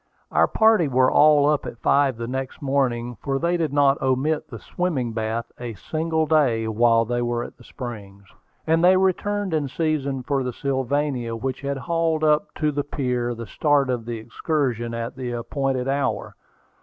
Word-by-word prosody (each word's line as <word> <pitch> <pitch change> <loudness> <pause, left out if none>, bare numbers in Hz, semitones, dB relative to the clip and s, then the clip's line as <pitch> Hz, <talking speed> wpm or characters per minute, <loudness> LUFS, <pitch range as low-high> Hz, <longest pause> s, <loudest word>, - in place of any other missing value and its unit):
Our - - +4
party 220 -7 +4
were 130 -1 +3
all 150 -1 +5
up 150 -1 +1
at - - -7
five 140 0 +2
the 115 - -4
next 130 +2 -4
morning, 125 -4 -1
for 135 -1 -1
they 170 +4 0
did 165 -4 -1
not 140 0 +3
omit 135 +4 0
the 120 - -7
swimming 130 - -2
bath 110 +1 -3
a 120 -2 -6
single 160 - -1
day 130 -8 +2
while 115 +1 +3
they 120 +1 -1
were 120 0 -1
at - - -10
the - - -15
Springs; 100 -6 -8 0.4
and 165 +1 +2
they 185 +1 +6
returned 190 +1 0
in 150 -3 0
season 140 -2 -1
for 140 +1 0
the 125 -1 -3
Sylvania, 135 -3 -1
which 130 +3 -4
had 140 0 -2
hauled 160 +3 0
up 155 +5 +2
to 150 -1 0
the 145 0 -2
pier 125 -4 -2
to 115 0 -7
start 140 +3 +1
on 120 -3 -3
the 120 -1 -4
excursion 120 0 -2
at 115 0 -4
the 125 -2 -4
appointed 130 +2 -2
hour. 140 0 -1
135 Hz, 180 wpm, -23 LUFS, 120-150 Hz, 0.4 s, they